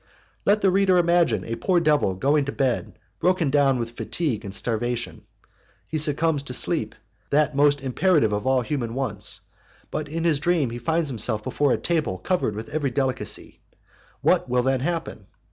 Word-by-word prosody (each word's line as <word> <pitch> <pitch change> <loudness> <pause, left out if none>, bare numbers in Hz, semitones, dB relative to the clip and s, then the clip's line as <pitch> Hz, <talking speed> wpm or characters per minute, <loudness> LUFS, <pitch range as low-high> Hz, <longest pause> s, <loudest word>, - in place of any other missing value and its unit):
Let 210 +1 +3
the 195 - +4
reader 190 -1 +3
imagine 170 - +3
a 115 - -4
poor 180 +8 +1
devil 150 - +2
going 140 +8 +2
to 140 - -3
bed 120 -8 -1 0.2
broken 175 -4 +2
down 140 -2 +3
with 115 -1 -3
fatigue 120 -1 -3
and 100 - -6
starvation; 115 +4 -3 0.6
he 155 - -2
succumbs 155 0 +1
to 130 -3 -6
sleep, - - -1 0.3
that 150 0 +2
most 145 0 +3
imperative 135 - +2
of 105 +5 -2
all 130 -1 +3
human 120 -3 -3
wants, 135 0 -3 0.5
but 150 -1 -3
in 165 +2 -3
his 160 -4 +2
dream 155 -5 +1
he 120 - -5
finds 160 +5 0
himself 110 -2 -1
before 145 +3 +1
a - - +2
table 155 - -1
covered 175 - -1
with 110 +6 -6
every 145 -1 -1
delicacy; 130 0 -3 0.6
what - - +2
will 125 0 +2
then 135 0 +1
happen? 160 - -3
140 Hz, 175 wpm, -24 LUFS, 120-160 Hz, 0.6 s, the